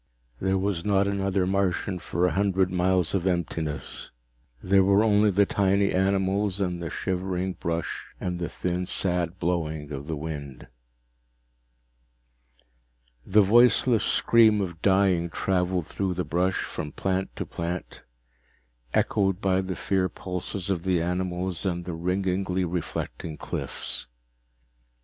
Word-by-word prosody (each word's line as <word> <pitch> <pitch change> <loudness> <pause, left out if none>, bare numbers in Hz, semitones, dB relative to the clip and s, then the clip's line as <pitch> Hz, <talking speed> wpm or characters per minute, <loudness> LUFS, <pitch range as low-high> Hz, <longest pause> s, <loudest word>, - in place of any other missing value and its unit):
There 95 0 +1
was 95 -3 -1
not 100 -1 +2
another 100 -1 0
Martian 95 0 0
for 90 +1 -1
a 90 - +2
hundred 95 +1 +1
miles 90 -1 +1
of 95 -2 0
emptiness. 80 -5 -3 0.5
There 95 +1 +4
were 100 +2 +4
only 105 -1 +4
the 100 +1 +4
tiny 100 0 +2
animals 95 +1 +1
and 90 -3 -1
the 85 - -3
shivering 95 +1 -2
brush 85 -2 -3
and 90 -1 -3
the 85 - -3
thin, 90 0 -2
sad 90 -2 0
blowing 80 -4 -2
of 70 0 -6
the 80 - -2
wind. 70 -3 -6 2.6
The 105 +2 +5
voiceless 120 +2 +4
scream 110 -2 +4
of 85 -4 -4
dying 95 -3 +3
traveled 90 -1 0
through 95 +2 -2
the 90 -1 -2
brush, 90 +5 0
from 75 -1 -5
plant 95 0 -2
to - - -4
plant, 85 +1 -5 0.9
echoed 95 -2 +2
by 95 -2 +2
the 95 -1 -4
fear 95 +1 0
pulses 90 +1 -4
of 90 -3 -1
the 95 -2 +2
animals 90 +1 -2
and 90 -3 -2
the 90 - -4
ringingly 90 +2 -1
reflecting 85 -2 -4
cliffs. - - -3
95 Hz, 130 wpm, -26 LUFS, 85-95 Hz, 2.6 s, The